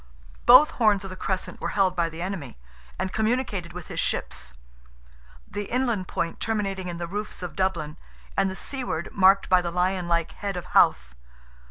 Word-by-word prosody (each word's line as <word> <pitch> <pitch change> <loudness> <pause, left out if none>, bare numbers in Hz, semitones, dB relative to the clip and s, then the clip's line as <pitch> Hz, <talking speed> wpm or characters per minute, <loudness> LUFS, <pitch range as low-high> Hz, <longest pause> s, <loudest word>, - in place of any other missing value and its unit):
Both 255 +5 +9
horns 210 -4 +3
of 195 - -7
the - - -6
crescent 185 0 -4
were - - -1
held 190 -2 +3
by 170 -2 +1
the 165 +1 -6
enemy, 180 - -5 0.4
and 190 0 -3
communicated 220 -6 -1
with 175 -2 -8
his - - -6
ships: 65 - -2 0.9
the 205 0 -4
inland 235 -5 -1
point 165 0 -3
terminating 195 -4 -2
in 175 -1 -4
the 170 - -3
roofs 205 +2 -5
of 175 - -6
Dublin, 170 -6 -1 0.4
and 195 0 +2
the 190 - -5
seaward 245 - -4
marked 195 0 +5
by 185 -1 +5
the 175 - -3
lion 180 +1 0
like 170 -1 +1
head 200 -3 -4
of 175 - -5
Howth. - - +4
190 Hz, 180 wpm, -25 LUFS, 175-205 Hz, 0.9 s, Both